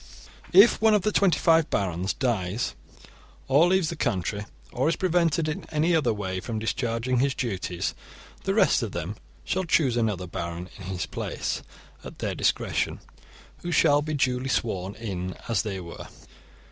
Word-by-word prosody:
* - - -22 0.2
If 200 +6 +7
one 220 -1 +5
of 205 - +1
the 215 - +2
twenty 195 -4 +3
five 165 -1 +4
barons 95 -1 -1
dies 115 -4 -1 0.7
or 145 +6 +5
leaves 185 -3 +2
the 170 - -4
country, 105 - -2 0.3
or 130 +5 +1
is 165 - +1
prevented 170 -4 +1
in 160 +6 -3
any 160 +2 +2
other 145 -7 +2
way 95 -3 -3
from 110 +4 -4
discharging 115 +2 -1
his 135 +1 +1
duties, 95 -7 -2 0.5
the - - 0
rest - - +4
of - - -4
them 85 +4 -4 0.3
shall 190 - -1
choose 155 -8 +2
another 105 -6 0
baron 85 +1 -5
in 95 - -9
his 95 -1 -3
place, - - -3 0.4
at - - -9
their - - -2
discretion, - - 0 0.6
who 175 - -4
shall 145 -3 +4
be 155 +1 -3
duly 130 -1 0
sworn 100 -5 -1
in 95 -5 -4
as 115 -5 +1
they 100 -3 -4
were. 85 -2 -9
120 Hz, 170 wpm, -26 LUFS, 95-160 Hz, 0.7 s, If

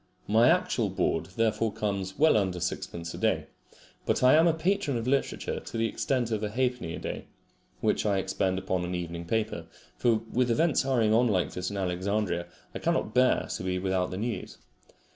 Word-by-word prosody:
My 115 +3 +5
actual - - +2
board - - 0
therefore 115 0 +1
comes 100 -2 -3
well 160 +1 +5
under 95 -4 +1
sixpence 85 -1 -4
a - - -7
day, - - +1 0.6
but - - 0
I 125 - +7
am 160 +2 +6
a 165 - +4
patron 170 -5 0
of 115 - -3
literature 135 +2 -1
to - - -7
the 115 - +1
extent 120 -1 -1
of 110 -2 -1
a 105 - -1
halfpenny 125 -6 -1
a - - -6
day, - - -5 0.6
which - - +1
I 100 -2 +1
expend 95 0 0
upon 95 -1 -1
an 90 +1 -3
evening 85 -1 -5
paper; 95 -4 -2 0.3
for 115 -2 +2
with 125 +1 +2
events 155 +6 +3
hurrying 120 -5 +2
on 120 +2 +4
like 95 -5 +1
this 90 0 -3
in 100 - -5
Alexandria, 95 0 -1 0.3
I - - -5
cannot 110 - 0
bear 125 0 +3
to - - -3
be 90 0 -1
without 95 -1 0
the 95 - -5
news. 115 +3 -4
105 Hz, 195 wpm, -28 LUFS, 95-125 Hz, 0.6 s, I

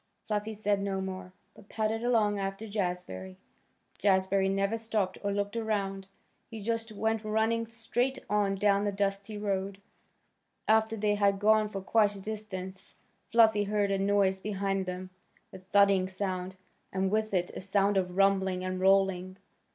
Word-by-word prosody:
Fluffy 215 0 -2
said 205 -1 0
no 195 -1 -2
more, 190 -1 -5 0.2
but 200 - -18
padded 220 +1 -1
along 215 -4 +2
after 195 +2 -4
Jazbury. 180 - -4 0.6
Jazbury 190 0 +2
never 195 +2 0
stopped 220 -4 -2
or 200 - -1
looked 205 +1 -2
around. 200 -4 -2 0.4
He 225 - -7
just 225 +1 -2
went 220 +1 -1
running 220 +2 0
straight 235 +3 -1
on 205 -1 +1
down 200 0 +2
the 205 - 0
dusty 200 +1 -2
road. 195 -1 -2 0.9
After 220 +1 +3
they 210 0 +1
had 200 -1 +2
gone 215 +1 +3
for 195 -2 -5
quite 205 +1 +2
a - - -8
distance 195 -3 -7 0.4
Fluffy 220 -3 +5
heard 205 -1 0
a 195 - +1
noise 195 -1 +2
behind 195 -1 -2
them, 185 +1 -5 0.4
a 190 - -8
thudding 195 0 +3
sound, 185 -1 -3 0.4
and 190 0 0
with 215 0 0
it 180 -2 0
a - - -7
sound 200 +1 +1
of 180 -1 -1
rumbling 190 -2 +2
and 185 0 -3
rolling. 190 -1 +2
200 Hz, 155 wpm, -30 LUFS, 190-215 Hz, 0.9 s, Fluffy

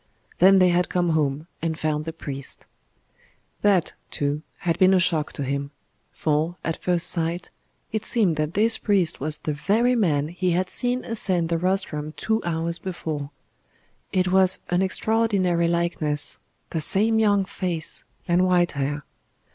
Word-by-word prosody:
Then 195 +2 +7
they 185 -1 +5
had 175 0 +1
come 175 -1 +1
home, 150 -2 0 0.2
and 160 -1 -2
found 155 -1 -1
the 165 - -3
priest. 140 -4 -5 1.0
That, 195 -5 +2 0.2
too, 145 +1 -2 0.2
had 170 0 -1
been 190 0 +6
a - - +4
shock 170 -4 +1
to 145 - -4
him; 140 +1 -2 0.4
for, 155 +3 0
at 165 - -3
first 175 -2 +1
sight, 170 +1 0 0.4
it 220 0 -2
seemed 210 -9 +1
that 155 +1 -2
this 220 +2 +4
priest 195 -6 +1
was 150 +2 -1
the 155 - -3
very 220 +11 +2
man 155 -9 +1
he 180 +1 -1
had 185 +2 -1
seen 245 +1 -1
ascend 185 -7 0
the 170 -1 0
rostrum 170 -5 -1
two 220 0 0
hours 170 0 -2
before. 160 -5 -5 0.8
It 185 -1 +1
was 190 -1 +5
an 175 +1 +2
extraordinary 190 -3 +1
likeness 170 -3 -1 0.3
the 160 - -1
same 220 +7 +3
young 205 -3 +3
face 180 -4 -3 0.2
and 175 +1 +3
white 180 -1 +3
hair. 145 +1 -3
175 Hz, 155 wpm, -24 LUFS, 155-190 Hz, 1.0 s, Then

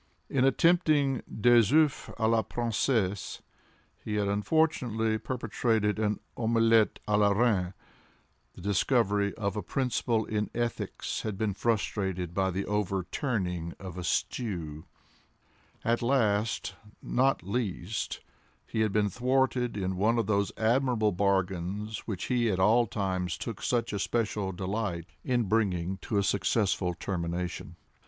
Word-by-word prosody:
In 130 - +2
attempting 145 -2 +3 0.2
des 120 -2 +5
oeufs 155 -1 +3
à 110 -1 +2
la 115 0 +3
Princesse, 110 -4 -1 0.6
he 105 - -3
had 105 -1 +1
unfortunately 110 -1 +1
perpetrated 110 -3 0
an 105 -2 0 0.2
omelette 115 -1 +3
à 105 0 +3
la 105 -1 +5
Reine; 100 -4 +1 0.8
the - - -11
discovery 100 +1 +2
of 100 -3 -2
a 105 - -2
principle 115 +1 0
in 105 -1 -2
ethics 120 -1 -3
had 105 -3 -4
been 105 -1 0
frustrated 95 -5 -1
by 95 +1 +1
the 95 +2 -2
overturning 95 - -2
of 95 -2 -8
a 90 - -5
stew; 85 -5 -2 1.0
and 115 +1 +1
last, 115 -4 +1 0.3
not 135 -5 +1
least, 100 -1 -3 0.4
he 110 - -4
had 110 -2 +2
been 105 0 +2
thwarted 125 0 +1
in 95 -1 -1
one 110 +5 +2
of 115 - +1
those 100 -1 +1
admirable 115 -1 +2
bargains 95 +2 -1
which 100 -5 -3
he 120 -3 +1
at 95 - 0
all 115 +5 +4
times 95 -4 -2
took - - -6
such 115 -3 0
especial 105 -1 -1
delight 95 -2 -3 0.2
in 125 -2 +1
bringing 95 -4 0
to 100 +3 -3
a 100 - +3
successful 95 -3 +1
termination. 90 -1 -4
105 Hz, 130 wpm, -29 LUFS, 95-120 Hz, 1.0 s, des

